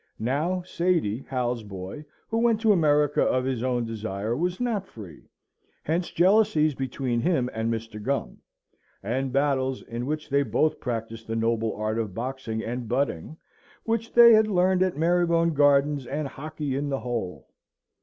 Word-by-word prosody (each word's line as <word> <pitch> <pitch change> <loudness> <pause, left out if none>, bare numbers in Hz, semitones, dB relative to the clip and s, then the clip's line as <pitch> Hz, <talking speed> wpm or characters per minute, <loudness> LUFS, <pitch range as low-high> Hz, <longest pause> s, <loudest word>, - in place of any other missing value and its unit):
Now, 155 +10 -1
Sady, 170 - 0
Hal's 125 -2 -1
boy, 100 +7 -8 0.2
who 225 - -1
went 230 -2 +3
to 220 -2 +4
America 150 -5 +3
of 130 0 +1
his 130 -3 -2
own 125 -2 0
desire, 110 0 -3
was 175 +5 -1
not 225 -6 -1
free. 95 -9 -12 0.5
Hence 170 +3 -1
jealousies 175 -5 +3
between 130 -2 -2
him 130 -7 +1
and 110 +1 -1
Mr. 115 -1 -5
Gum; 135 +5 -2 0.6
and 130 +5 -2
battles, 135 -1 0
in 120 +2 -5
which 155 +1 -3
they 140 -1 +2
both 155 +2 0
practised 115 -2 -5
the 115 - -3
noble 115 0 0
art 110 +2 -2
of 105 -5 -4
boxing 120 -2 -4
and 120 0 -4
butting, 135 - -2 0.5
which 230 0 -2
they 235 -1 +8
had 215 0 +5
learned 185 -2 +2
at 185 -3 +1
Marybone 170 0 +2
Gardens 145 -2 +3
and 145 +2 -3
Hockley 150 0 -5
in 145 +1 -2
the 135 -1 -2
Hole. 115 -7 -4
135 Hz, 160 wpm, -26 LUFS, 115-165 Hz, 0.6 s, they